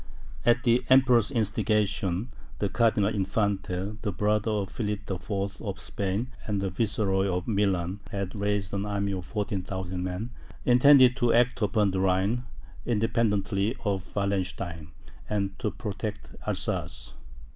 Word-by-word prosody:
At 120 +2 +4
the 120 0 +3
Emperor's 130 -4 +5
instigation, 105 -3 0 0.3
the 100 - -1
Cardinal 110 -2 +2
Infante, 100 0 -1
the 105 - -1
brother 105 +3 +1
of 105 -3 -1
Philip 105 -2 -2
IV. 100 +1 -3
of 100 -3 -4
Spain, 100 +5 -2 0.2
and 105 -2 0
the 95 -1 -1
Viceroy 100 -1 +1
of 90 -1 -2
Milan, 100 -3 0
had 100 -3 -3
raised 100 -1 -1
an 100 +1 -1
army 100 -1 -1
of 90 -2 -4
14,000 95 -3 -3
men, 95 +6 -4 0.3
intended 125 0 +7
to 120 -3 +3
act 125 +1 +3
upon 105 -1 +2
the 95 - -1
Rhine, 95 +6 +1 0.4
independently 110 -2 +1
of 95 -2 -2
Wallenstein, 95 -5 -2 0.4
and 100 -2 -1
to 110 - 0
protect 105 +1 -5 0.2
Alsace. - - -2
100 Hz, 135 wpm, -27 LUFS, 95-110 Hz, 0.4 s, intended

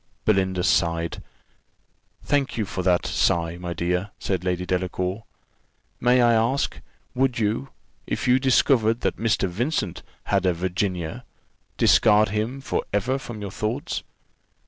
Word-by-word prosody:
Belinda 95 -3 +2
sighed. 85 -1 +1 1.0
"Thank 145 -3 0
you 110 - 0
for 95 - -4
that 90 -1 +2
sigh, 85 0 +1
my 90 -1 -5
dear," 90 +3 -1
said 95 -3 -2
Lady 90 0 -1
Delacour. 90 +3 -2 0.7
"May 125 0 +4
I 120 -1 +5
ask, 115 +5 0 0.3
would 130 -1 +1
you, 115 +5 -1 0.4
if - - -2
you 125 +1 +5
discovered 120 -3 +3
that - - -1
Mr. 110 -3 +1
Vincent 120 - -2 0.2
had 95 -2 +1
a 90 - +3
Virginia, 90 -1 -2 0.5
discard 105 -1 +5
him 110 +6 -2
for - - -2
ever 120 +7 0
from 120 -5 -8
your 100 - -5
thoughts?" 120 - -3
105 Hz, 135 wpm, -24 LUFS, 90-120 Hz, 1.0 s, I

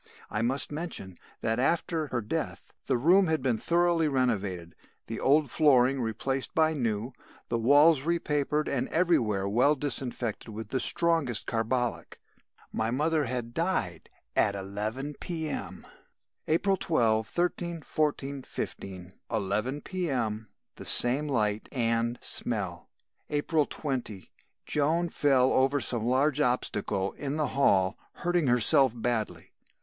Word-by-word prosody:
"I 110 - -1
must 130 +5 0
mention 150 - -6 0.3
that 115 +1 0
after 160 +2 0
her 125 -3 -2
death, 105 - -4
the - - +2
room 180 +9 +4
had 160 -4 0
been 120 -5 +1
thoroughly 170 0 +2
renovated, 100 - -1 0.3
the - - -5
old 145 +2 +3
flooring 135 -3 +4
replaced 130 +4 -3
by 160 0 +3
new, 120 -3 -2 0.4
the 115 - 0
walls 145 +5 +5
repapered 150 -2 0
and 130 -2 -1
everywhere 115 - +1
well 125 +9 +3
disinfected 125 -5 -3
with 110 0 -7
the 130 - -1
strongest 160 -5 +3
carbolic. 120 +1 -2 0.5
My 110 0 -1
mother 150 +4 +1
had 120 -1 -4
died 165 - -1 0.3
at 100 - +2
11 105 +9 -4
P.M. 160 -4 -5 0.6
"April 190 +5 +2
12, 110 -10 +1
13, 170 +1 -2
14, 140 -2 -2
15; 95 -6 -7 0.2
11 110 +6 -2
P.M. 125 - -2 0.3
The - - -9
same 130 +5 +4
light 105 -6 -1
and 115 -1 0
smell. - - -2 0.4
"April 150 0 +1
20. 125 - -5 0.3
Joan 160 +4 +1
fell 135 -5 +3
over 135 +2 +2
some 120 -4 0
large 140 +3 +2
obstacle 105 -6 0
in 140 0 -5
the 155 -2 0
hall, 95 -9 +2
hurting 175 -4 0
herself 125 +1 +5
badly. 115 -2 -3
130 Hz, 125 wpm, -28 LUFS, 115-150 Hz, 0.6 s, walls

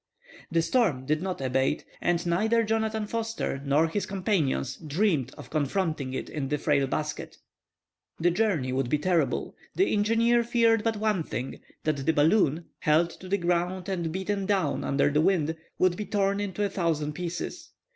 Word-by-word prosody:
The 165 -1 +2
storm 170 - +1
did 155 +3 0
not 185 -5 -3
abate. 130 +3 0 0.2
And 175 0 +1
neither 220 +7 +2
Jonathan 220 0 0
Forster 225 -10 -3
nor 145 +3 +3
his 200 +5 -2
companion 190 -9 0 0.2
dreamed 150 - +1
of - - -11
confronting 155 -3 -1
it - - -4
in 145 -3 -4
that 150 +1 -2
frail 140 -3 +2
basket. 150 +2 -4 0.8
The 175 +2 +3
journey 170 -10 0
would 130 -2 0
be 150 - +2
terrible. 175 +2 0 0.2
The 385 - +2
engineer 230 +3 +3
feared 230 -2 +3
but 225 -1 0
one 210 -4 +1
thing; 130 -4 -5 0.2
that 150 -3 -1
the 160 - +2
balloon, 160 0 +3
held 170 +1 +3
to 185 - -11
the 200 - +2
ground 175 +1 -1
and 170 -4 -2
beaten 190 +2 -2
down 190 -8 +1
under 140 +1 +2
the 150 +1 +3
wind, 165 -3 +2 0.2
would 185 -1 +3
be 210 +2 -5
torn 200 -1 +1
into 205 0 -2
a 200 - +1
thousand 160 -6 -1
pieces. 175 +1 -5
175 Hz, 170 wpm, -27 LUFS, 150-205 Hz, 0.8 s, nor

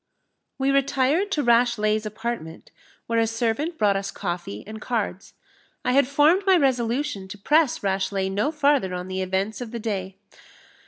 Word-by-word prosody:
We 270 0 +1
retired 275 +7 +2
to 295 - 0
Rashleigh's 230 -3 +2
apartment, 215 -6 -6 0.3
where 230 0 0
a 225 - +2
servant 235 +9 -1
brought 205 -2 +3
us 195 0 -2
coffee 175 - -5
and 215 +1 -9
cards. 210 -6 -3 0.5
I 250 - +2
had 270 0 +4
formed 295 +7 +4
my 380 -1 +6
resolution 250 - 0
to 190 - -9
press 295 +6 +2
Rashleigh 190 0 -1
no 210 +9 0
farther 285 - +2
on 180 +1 -6
the 190 0 -2
events 190 +5 -2
of 240 - -5
the 235 +1 -5
day. 195 -4 -4
225 Hz, 160 wpm, -24 LUFS, 195-275 Hz, 0.5 s, my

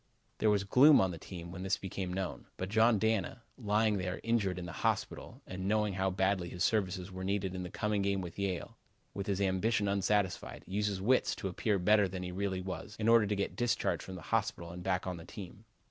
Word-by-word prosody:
There 110 - +3
was 100 -2 +3
gloom 135 +9 +7
on 95 -1 +2
the 85 - -7
team 85 -1 -8
when 90 +1 -7
this 95 +4 0
became 95 -2 -4
known. 95 0 -4
But 95 - -3
John 110 +1 +4
Dana, 110 +2 0
lying 105 -2 +1
there 90 0 -3
injured 110 -6 +1
in 90 - -5
the 85 - -6
hospital, - - -2
and 95 0 -5
knowing 105 -1 +2
how 95 +1 +1
badly 95 -1 0
his 90 +1 -3
services 95 -3 0
were 95 0 -6
needed 95 -1 -1
in 95 - -4
the 90 - -5
coming 105 +2 -1
game 100 0 +1
with 90 0 -7
Yale, 95 -3 -3 0.3
with 100 - -4
his 100 -1 0
ambition 100 +2 +1
unsatisfied, 100 -1 0
used 105 +2 0
his 95 -2 -4
wits 130 +5 +3
to 95 - -4
appear 100 +3 0
better 105 +2 +4
than 90 0 -5
he 90 - -4
really 95 0 -2
was 95 +2 -6
in 110 - -1
order 115 -2 +6
to 105 - 0
get 100 - -2
discharged 120 -1 0
from 95 - -8
the 90 - -9
hospital 105 -6 0
and 90 +1 -7
back 95 0 -1
on 90 -1 -3
the 85 - -9
team. 105 +2 -10
95 Hz, 225 wpm, -32 LUFS, 95-105 Hz, 0.3 s, gloom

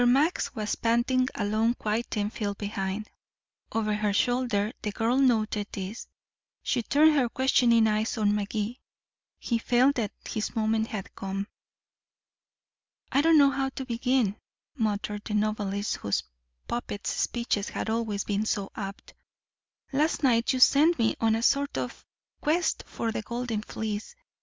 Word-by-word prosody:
Max 280 +4 +2
was 215 -2 -2
panting 240 +2 +2
along 220 +3 +1
quite 220 +2 -2
ten 210 -1 -1
feet 205 -3 -3
behind. 200 0 -3 0.6
Over 215 -1 0
her 210 -1 0
shoulder 240 -2 +1
the 210 - -2
girl 225 +5 +1
noted 215 -5 +2
this; 195 +4 -6 0.6
she 240 - 0
turned 305 +6 +4
her 260 -5 +2
questioning 240 -3 +4
eyes 215 +1 0
on 205 -1 +2
Magee; 210 +3 -2 0.6
he 235 -2 -1
felt 255 +4 +3
that 215 -4 -1 0.2
his 215 - -3
moment 220 0 +1
had 210 -4 -6
come. 195 +1 -4 1.7
"I 275 - +4
don't 325 +1 +5
know 280 -2 +6
how 270 -1 -1
to 265 0 -6
begin," 240 -3 +1 0.4
muttered 210 -3 -1
the 215 - -3
novelist 210 -1 -1
whose 100 - -1 0.4
puppets' 235 -3 -3
speeches 235 -4 -1
had - - -4
always 220 -3 -1
been 210 +1 -1
so 200 -3 -1
apt. 195 -2 -7 0.8
"Last 305 +3 +1
night 235 -3 +3
you 260 - -1
sent 310 +6 +6
me 230 -2 +2
on 225 -1 +3
a 225 - -2
sort 280 +3 +2
of - - -4 0.4
quest 330 +4 +1
for 230 - -3
the 220 - -3
golden 235 -1 -3
fleece. 215 - -5
225 Hz, 145 wpm, -27 LUFS, 210-250 Hz, 1.7 s, know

